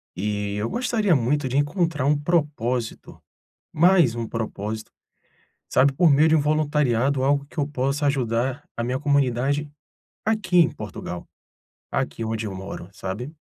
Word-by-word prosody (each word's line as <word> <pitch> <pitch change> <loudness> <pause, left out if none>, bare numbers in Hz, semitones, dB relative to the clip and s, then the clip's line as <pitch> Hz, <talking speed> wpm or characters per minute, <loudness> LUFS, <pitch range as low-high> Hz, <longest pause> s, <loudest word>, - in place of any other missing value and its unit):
e, 105 +1 -2
eu 105 +3 -2
gostaria 225 -7 +1
muito 135 +3 +1
de 130 +2 -1
encontrar 150 -1 0
um 150 +1 +3
propósito, 145 -7 -2 0.5
mais 170 -6 +4
um 115 -1 -3
propósito, 110 -1 -4 0.8
sabe, 135 +2 +4
por 165 +4 +4
meio 150 +3 +5
de 160 - +5
um 155 - +3
voluntariado, 145 -3 +1
algo 140 +1 +2
que 145 - -21
eu 145 -2 +1
possa 140 +1 -1
ajudar 130 0 0
a 115 - -2
minha 125 +2 -1
comunidade, 140 +1 +1 0.5
aqui 215 -4 0
em 165 -2 +6
Portugal. 90 -4 -7 0.6
Aqui 95 +10 -2
onde 110 0 -2
eu 100 - -5
moro, 95 -2 -7
sabe. 105 +8 -5
135 Hz, 145 wpm, -24 LUFS, 115-150 Hz, 0.8 s, em